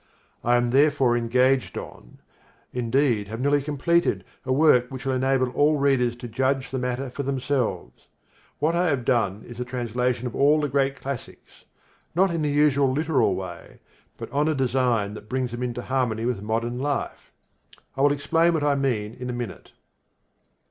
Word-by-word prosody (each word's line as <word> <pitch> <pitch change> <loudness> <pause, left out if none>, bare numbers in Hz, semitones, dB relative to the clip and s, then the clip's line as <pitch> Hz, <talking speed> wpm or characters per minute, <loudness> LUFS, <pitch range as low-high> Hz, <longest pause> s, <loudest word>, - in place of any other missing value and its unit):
I 120 +1 +3
am 120 0 +1
therefore 135 -3 +3
engaged 125 +3 +1
on, - - -10 0.6
indeed 120 -3 +1
have 110 +2 -6
nearly 145 +2 +2
completed, 150 - +1 0.2
a 130 - -2
work 130 -3 +4
which 130 -1 -8
will 135 - 0
enable 130 -1 +1
all 150 +3 +3
readers 135 -4 +2
to 120 0 -8
judge 130 +3 -1
the 130 - -2
matter 125 +1 -3
for 140 - -4
themselves. 130 - -2 0.5
What 155 +3 +1
I 175 +1 +2
have 135 -6 0
done 110 -5 +1
is 120 0 -10
a - - -1
translation 125 0 -2
of 120 - -4
all 145 +3 +4
the 145 -1 -1
great 135 0 0
classics, 135 -2 -8 0.5
not 190 +1 +3
in 165 - -1
the 150 - 0
usual 145 -2 +3
literal 145 - +1
way 90 -2 -8 0.4
but - - -8
on 145 +2 +1
a 155 - +1
design 125 -6 +1
that 105 0 -11
brings 130 -1 -1
them 120 +1 -5
into 125 -1 -3
harmony 125 -4 -1
with 120 -5 -1
modern 115 +3 -2
life. 145 +1 -3 0.6
I 135 - -2
will 145 +1 +5
explain 165 +4 +2
what 155 - -1
I 145 -1 +3
mean 120 -6 -1
in 125 +1 -7
a - - -2
minute. 120 -6 -6
130 Hz, 175 wpm, -24 LUFS, 120-140 Hz, 0.6 s, will